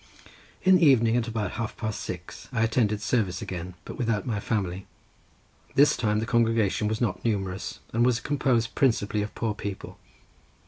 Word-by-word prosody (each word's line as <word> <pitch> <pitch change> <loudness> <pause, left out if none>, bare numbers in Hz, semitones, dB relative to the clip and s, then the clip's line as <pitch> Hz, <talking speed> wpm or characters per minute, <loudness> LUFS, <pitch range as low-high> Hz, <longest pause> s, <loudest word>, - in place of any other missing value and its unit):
In 185 0 +6
the 175 - +1
evening, 115 -4 +5
at 120 -1 +1
about 110 -4 -2
half 115 0 -4
past 110 -2 -3
six, - - -7
I 115 -3 +1
attended 110 -2 +1
service 100 -8 0
again, 90 0 -6
but - - -8
without 115 -5 0
my 110 -4 -1
family. 95 -3 -2 0.9
This 145 +1 +6
time 105 -3 0
the 110 - 0
congregation 115 -3 +2
was 110 +1 -1
not 110 -7 -1
numerous, 95 -4 -2
and 115 +1 +3
was 125 -1 +3
composed 125 -5 0
principally 105 -5 +1
of 105 - -5
poor 115 -2 -1
people. 100 -2 -7
110 Hz, 170 wpm, -26 LUFS, 105-120 Hz, 0.9 s, In